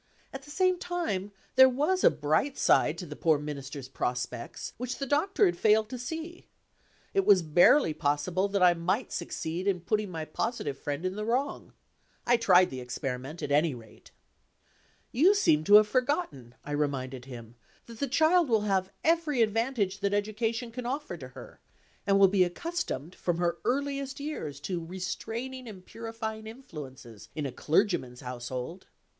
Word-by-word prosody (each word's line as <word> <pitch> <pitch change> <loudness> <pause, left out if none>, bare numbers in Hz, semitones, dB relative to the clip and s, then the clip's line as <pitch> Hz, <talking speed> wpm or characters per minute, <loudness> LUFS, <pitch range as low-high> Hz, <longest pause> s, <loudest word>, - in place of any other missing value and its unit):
At 270 - -6
the 285 - -15
same 370 +3 +2
time, 325 - -3 0.2
there 260 0 +8
was 300 +9 0
a - - +8
bright 155 - 0
side 155 - +3
to 180 - -6
the 150 -2 -8
poor 160 -1 +3
Minister's 140 -2 -6
prospects 125 -2 -4
which 250 +1 -4
the 275 - -3
Doctor 320 - +2
had 355 - +2
failed 215 0 +3
to 255 -1 -6
see. 325 +7 -6 0.7
It 390 - +3
was 195 - +5
barely 170 - +5
possible 150 +7 0
that 200 -2 +1
I 180 -1 +7
might 180 +8 -1
succeed 170 +1 -4
in 185 -3 +1
putting 210 +3 -1
my 160 -3 -5
positive 155 - -3
friend 145 +3 -4
in 185 +1 -2
the 210 - -3
wrong. 250 +6 -2 0.5
I 240 - +5
tried 185 -5 +5
the 130 - -5
experiment, 130 +4 -5
at 145 - -3
any 150 0 +3
rate. 115 -2 -15 1.0
"You 350 - +5
seem 155 - +3
to 205 - +7
have 210 0 +8
forgotten," 250 - -1
I 145 - -6
reminded 135 -4 -2
him, 120 -3 -10 0.3
"that 230 -1 -12
the 280 - 0
child 315 +4 +3
will 220 -2 +3
have 195 -3 0
every 315 -6 +3
advantage 220 -3 0
that 200 0 0
education 225 +3 -2
can 245 +1 -5
offer 285 +4 -3
to - - -9
her, - - -12 0.5
and 195 0 +4
will 195 0 +7
be 190 -1 +3
accustomed 180 - -3
from 175 -2 -2
her 170 -1 0
earliest 275 +1 -2
years 165 - -5
to 175 +1 -3
restraining 225 +9 -5
and 190 -4 -10
purifying 225 -1 -6
influences, 130 - -10
in 150 -2 -3
a 135 - -3
clergyman's 150 - 0
household." 125 +7 -6
195 Hz, 170 wpm, -29 LUFS, -, 1.0 s, there